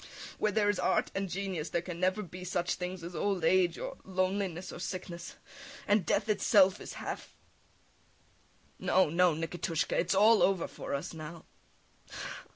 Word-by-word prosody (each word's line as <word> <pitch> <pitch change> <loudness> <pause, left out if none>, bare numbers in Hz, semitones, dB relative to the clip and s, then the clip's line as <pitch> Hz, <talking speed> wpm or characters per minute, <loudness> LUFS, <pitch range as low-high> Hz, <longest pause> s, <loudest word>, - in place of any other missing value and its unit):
Where 215 - +2
there 205 0 +2
is 205 - +1
art - - +1
and 195 -1 -2
genius 180 -4 -3
there 170 +1 -1
can 175 -1 -6
never 185 +3 +1
be 180 +1 -9
such 175 -1 -1
things 180 -1 -5
as 170 +1 -7
old 195 -5 0
age 180 -1 +3
or - - -5
loneliness 185 -1 -1
or - - -8
sickness... 180 -2 -6 0.5
and 205 -3 +3
death 200 - +1
itself 205 -2 +4
is - - -7
half... - - -6 1.4
[Weeps] - - -7
No, 185 -4 +4
no, 175 -1 +4
Nikitushka! 165 0 -2
It 170 - +1
is 180 - +2
all 215 +2 +6
over 190 -3 +3
for - - -5
us 140 - -4
now! 160 +1 -8
185 Hz, 165 wpm, -31 LUFS, 170-195 Hz, 1.4 s, all